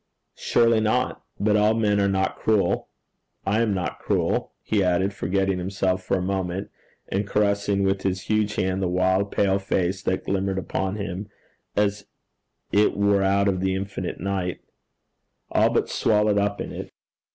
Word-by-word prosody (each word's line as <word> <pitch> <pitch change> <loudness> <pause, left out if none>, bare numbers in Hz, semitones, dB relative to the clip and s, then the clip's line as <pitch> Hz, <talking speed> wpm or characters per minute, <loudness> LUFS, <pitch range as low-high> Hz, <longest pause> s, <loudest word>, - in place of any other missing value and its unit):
'Surely 115 -1 +3
not. 115 +4 0 0.2
But 105 +1 +2
all 105 +1 +4
men 105 -2 +2
are 100 - +3
not 95 0 0
cruel. 110 -3 +1 0.6
I 105 +4 +2
am 115 -2 +1
not 95 -2 -2
cruel,' - - 0
he 105 -3 +1
added, 95 +2 +1
forgetting 95 0 0
himself 95 0 -1
for 95 - 0
a - - -2
moment, 95 0 -2 0.4
and 100 +1 -1
caressing 100 -1 +1
with 95 0 +1
his 95 -1 -1
huge 105 0 0
hand 95 0 0
the 95 - +1
wild 95 +2 +1
pale 100 -1 +2
face 95 -1 -1
that 95 - -1
glimmered 95 0 -1
upon 95 +1 -2
him 100 -1 -5 0.5
as 105 -1 0 0.6
it 105 0 +3
were 100 -1 +3
out 100 +1 +2
of 95 -2 +1
the 95 0 0
infinite 95 -1 -4
night 95 -2 -2 0.9
all - - +4
but - - +1
swallowed 105 -1 +2
up 100 0 0
in - - -4
it. - - -7
100 Hz, 165 wpm, -24 LUFS, 95-105 Hz, 0.9 s, all